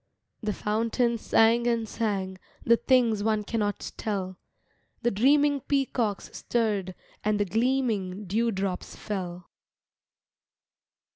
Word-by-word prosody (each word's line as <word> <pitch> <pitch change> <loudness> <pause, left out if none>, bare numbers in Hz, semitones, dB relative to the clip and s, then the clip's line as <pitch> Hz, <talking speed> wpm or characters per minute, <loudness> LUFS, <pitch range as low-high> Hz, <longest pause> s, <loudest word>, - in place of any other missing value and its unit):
The 215 -2 -1
fountain 230 +3 0
sang 230 +2 +3
and 230 -2 +1
sang 195 -4 -2 0.2
The 235 0 +5
things 235 -5 +3
one 215 -1 +1
cannot 205 -1 -2
tell, 190 -4 -3 0.6
The 240 - +2
dreaming 285 +6 +3
peacocks 245 -7 -1
stirred 205 -6 -1 0.3
And 210 0 +1
the 205 - +2
gleaming 215 -3 0
dew 225 +5 +1
drops 190 -3 -3
fell. 180 -4 -5
215 Hz, 110 wpm, -27 LUFS, 200-235 Hz, 0.6 s, The